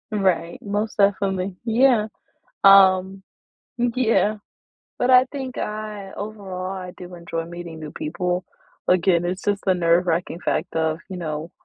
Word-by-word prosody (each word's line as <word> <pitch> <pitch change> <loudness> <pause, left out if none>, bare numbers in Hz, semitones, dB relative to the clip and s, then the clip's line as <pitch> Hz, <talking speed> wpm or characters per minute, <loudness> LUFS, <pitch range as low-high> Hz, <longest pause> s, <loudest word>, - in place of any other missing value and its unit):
Right, 185 -5 0
most 210 +2 -3
definitely. 195 -2 +1
Yeah. 235 -1 +3 0.6
Um, 190 -1 +6 0.6
yeah. 235 -3 +2 0.6
But 245 - +2
I 255 0 +7
think 265 -3 -5
I 210 -2 -5
overall, 195 -3 -6
I 185 -2 -6
do 180 0 -10
enjoy 170 -1 -4
meeting 170 -1 -8
new 155 -1 -7
people. 180 +4 -3 0.4
Again, 180 -1 +3
it's 185 +2 -3
just 205 -1 -1
the 190 - +4
nerve-wracking 170 0 +1
fact - - -2
of, 160 0 0
you 185 - -5
know 155 -1 -4
190 Hz, 135 wpm, -23 LUFS, 175-210 Hz, 0.6 s, I